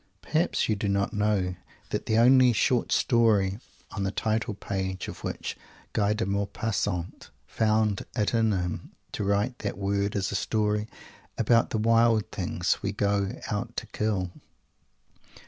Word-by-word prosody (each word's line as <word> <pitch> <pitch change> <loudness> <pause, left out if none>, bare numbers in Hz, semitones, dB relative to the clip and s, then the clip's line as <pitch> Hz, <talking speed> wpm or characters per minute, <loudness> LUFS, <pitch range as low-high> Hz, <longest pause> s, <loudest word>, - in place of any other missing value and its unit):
Perhaps 160 +3 +1
you 110 - +1
do 100 0 -2
not 100 +2 0
know 105 -3 +1 0.4
that - - -2
the 110 - +2
only 125 +1 +6
"short 120 +2 +1
story" 105 -5 +3 0.3
on 100 - -4
the 95 - 0
title 110 +1 -1
page 95 -2 -3
of - - -8
which - - -4 0.4
Guy 105 -1 +2
de 110 0 -1
Maupassant 100 -2 -2 0.2
found 110 -2 +1
it 105 -2 0
in 115 -1 +3
him 90 -3 -3 0.2
to - - -3
write 100 +5 0
that - - -3
word 100 0 -1
is 100 -1 -1
a - - -2
story 105 -1 0 0.5
about 115 +1 +3
the - - -1
wild 115 -2 +3
things - - -1
we 100 - -1
go 100 -1 0 0.2
out 115 +3 -3
to - - -2
kill? 100 -4 -2
105 Hz, 150 wpm, -27 LUFS, 100-115 Hz, 0.5 s, only